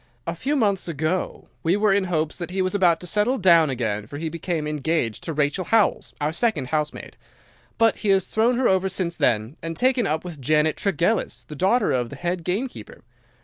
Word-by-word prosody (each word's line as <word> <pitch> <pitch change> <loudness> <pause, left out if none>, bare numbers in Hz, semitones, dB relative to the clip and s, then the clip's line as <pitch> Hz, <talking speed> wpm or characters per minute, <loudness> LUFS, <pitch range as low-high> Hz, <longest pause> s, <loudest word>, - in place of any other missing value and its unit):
A 170 - -2
few 270 - -2
months 205 -9 +1
ago 160 +3 -2
we 170 +4 +2
were 210 -1 +3
in 195 -1 +2
hopes 160 -3 -2
that 175 - -5
he 190 +1 -1
was 185 - -1
about 180 -5 +3
to - - -7
settle 210 +8 +1
down 170 - +5
again 110 -5 -2
for 145 - -8
he 160 +2 -3
became 165 -1 -3
engaged 150 -6 -1
to 165 - -3
Rachel 150 +4 0
Howells, 225 -2 +1
our 150 +1 -1
second 220 - 0
housemaid; 150 -1 -3 0.6
but 225 -1 +3
he 210 - -2
has 195 -1 +3
thrown 235 +3 +1
her 255 - +2
over 190 0 +2
since 180 -2 -2
then 110 +3 0
and 165 0 -5
taken 255 -1 +2
up 155 +1 -1
with 165 -6 -8
Janet 155 +3 +2
Tregellis, 200 +2 -1
the 150 - -7
daughter 195 - +2
of 125 -2 0
the - - -8
head 175 0 -3
gamekeeper. 185 - -4
175 Hz, 205 wpm, -23 LUFS, 155-200 Hz, 0.6 s, down